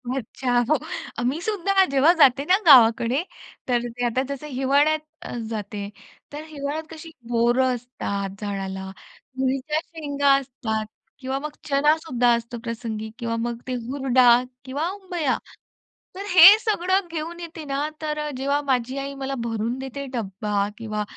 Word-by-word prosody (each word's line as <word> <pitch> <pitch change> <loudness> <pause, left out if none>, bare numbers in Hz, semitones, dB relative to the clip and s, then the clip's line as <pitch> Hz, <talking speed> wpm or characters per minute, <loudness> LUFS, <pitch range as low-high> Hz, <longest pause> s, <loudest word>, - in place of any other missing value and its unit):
अच्छा, 245 0 -1
हो. 310 - +4 0.5
मी 275 +6 0
सुद्धा 395 -2 +2
जेव्हा 275 +4 +5
जाते 275 -1 +6
ना 370 +3 +4
गावाकडे, 245 +1 +6 0.4
तर 240 -1 +1
ते 245 +1 -3
आता 240 +2 +1
जसं 300 +2 -8
हिवाळ्यात 285 +4 +2 0.5
जाते. 205 -2 -5 0.4
तर 300 +1 -6
हिवाळ्यात 305 0 -5
कशी 325 +1 -10 0.2
बोरं 240 +2 +2
असतात 200 -5 -5
झाडाला, 190 -2 -4 0.5
तुरीच्या 270 +4 0
शेंगा 285 -3 0
असतात 235 -5 -4 0.3
किंवा 265 +1 -3
मग 300 +1 -5 0.2
चणा 295 +2 +4
सुद्धा 250 -7 0
असतो 235 +1 -5
प्रसंगी 225 -2 -5
किंवा 230 -1 -2
मग 235 0 -2
ते 255 - -2
हुरडा 255 -2 +4 0.2
किंवा 290 +6 -2
उंबया. 360 -8 -2 0.8
तर 395 +1 -6
हे 360 0 +10
सगळं 380 -4 0
घेऊन 335 +2 -5
येते 330 -2 -8
ना, 280 +2 -1
तर 300 -1 -2
जेव्हा 280 +2 0
माझी 260 -1 -1
आई 275 0 -4
मला 270 0 -4
भरून 230 +2 -2
देते 270 +1 -6
डब्बा 205 -2 -2
किंवा 215 -2 -3
265 Hz, 140 wpm, -23 LUFS, 235-300 Hz, 0.8 s, हे